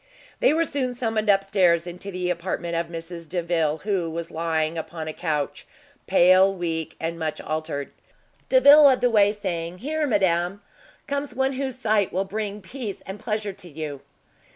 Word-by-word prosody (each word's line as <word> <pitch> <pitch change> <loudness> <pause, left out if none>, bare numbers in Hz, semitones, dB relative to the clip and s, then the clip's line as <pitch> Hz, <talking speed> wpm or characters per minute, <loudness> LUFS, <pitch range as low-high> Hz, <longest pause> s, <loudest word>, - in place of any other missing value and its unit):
They - - +4
were 330 +2 +2
soon 260 -5 -2
summoned 225 -3 -1
upstairs 195 -4 +3
into 180 +3 -7
the 180 -1 -2
apartment 170 -1 -3
of 170 0 -1
Mrs 165 0 -8
Delvile, 165 -3 0
who 190 -5 0
was 165 +1 -5
lying 160 -1 -1
upon 160 0 -5
a 155 - -4
couch, 150 -5 -3 0.4
pale, 185 +2 +6
weak, 165 -4 -3
and 165 +1 -3
much 155 -1 -3
altered. 155 -2 -4 0.6
Delvile 280 +3 +8
led 270 -4 +6
the 245 -1 +3
way, 205 -2 +5
saying, 180 -4 -4
"Here, 300 +7 -1
madam, 190 -3 +1 0.4
comes 280 -2 -3
one 265 +1 +1
whose 265 -1 -3
sight 215 -5 +1
will 190 +2 -1
bring 210 +1 -4
peace 225 -1 -6
and 190 +2 -7
pleasure 210 -2 -2
to 180 -1 -11
you!" 150 -3 -6
185 Hz, 165 wpm, -24 LUFS, 165-215 Hz, 0.6 s, Delvile